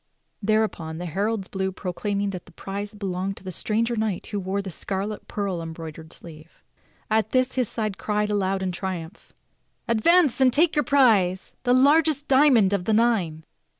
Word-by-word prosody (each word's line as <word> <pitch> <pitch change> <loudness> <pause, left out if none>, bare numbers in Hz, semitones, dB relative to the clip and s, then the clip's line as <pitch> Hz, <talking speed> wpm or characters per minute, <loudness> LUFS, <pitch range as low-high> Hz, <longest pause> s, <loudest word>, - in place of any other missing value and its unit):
Thereupon 210 -7 0
the 175 - -5
heralds 195 +4 -2
blew 190 -1 -2
pro 185 -1 -5
claiming 200 +1 -2
that 185 -2 -8
the - - -15
prize 200 +3 -6
belonged 195 -1 -3
to - - -12
the 185 - -5
stranger 225 +6 -1
knight 215 -4 -2
who 205 - -4
wore 190 +1 -2
the 195 -2 -5
scarlet, 200 +5 -4
pearl 195 -4 -3
embroidered 160 -1 -8
sleeve. 155 -2 -13 0.5
At 220 0 +1
this 255 0 +2
his 255 -4 0
side 215 -4 -3
cried 210 0 -1
aloud 195 -1 0
in 185 - -1
triumph: 180 +1 -6 0.6
"Advance, 275 +5 +3
and 260 -1 +6
take 320 +6 +3
your 295 - +4
prize, 210 -10 +3
the 245 -1 +2
largest 290 +2 +3
diamond 260 -8 +5
of 185 -3 -1
the 220 - +1
nine!" 205 -9 +1
205 Hz, 175 wpm, -24 LUFS, 185-230 Hz, 0.6 s, and